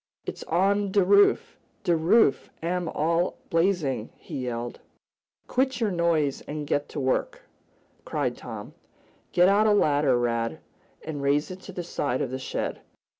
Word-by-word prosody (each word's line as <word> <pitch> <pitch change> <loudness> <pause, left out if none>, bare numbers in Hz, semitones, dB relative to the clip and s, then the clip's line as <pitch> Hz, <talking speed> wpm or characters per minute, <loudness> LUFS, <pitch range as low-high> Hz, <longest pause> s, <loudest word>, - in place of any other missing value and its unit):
"It's - - -6
on 195 +4 +1
de 200 0 +4
roof! 200 +1 +4 0.2
De 170 - +3
roof 165 0 +3
am 175 0 -1
all 165 +3 0
blazin'!" 165 - +1
he 130 - -6
yelled. 120 0 -4 0.7
"Quit 260 -1 0
your 220 -4 +1
noise, 165 -5 +1
and 150 0 -4
get 145 0 -1
to - - -5
work!" 130 -1 -1 0.6
cried - - -2
Tom. - - -8 0.6
"Get 175 +1 +5
out 205 +3 +4
a 210 - +5
ladder, 145 -8 +3
Rad, 115 +2 -1 0.5
and 150 -3 -4
raise 145 +4 +1
it 185 - -8
to 195 - -9
the 180 -1 -5
side 140 -6 -2
of 125 - -4
the 130 - -3
shed. 130 - -4
165 Hz, 155 wpm, -26 LUFS, 140-190 Hz, 0.7 s, Get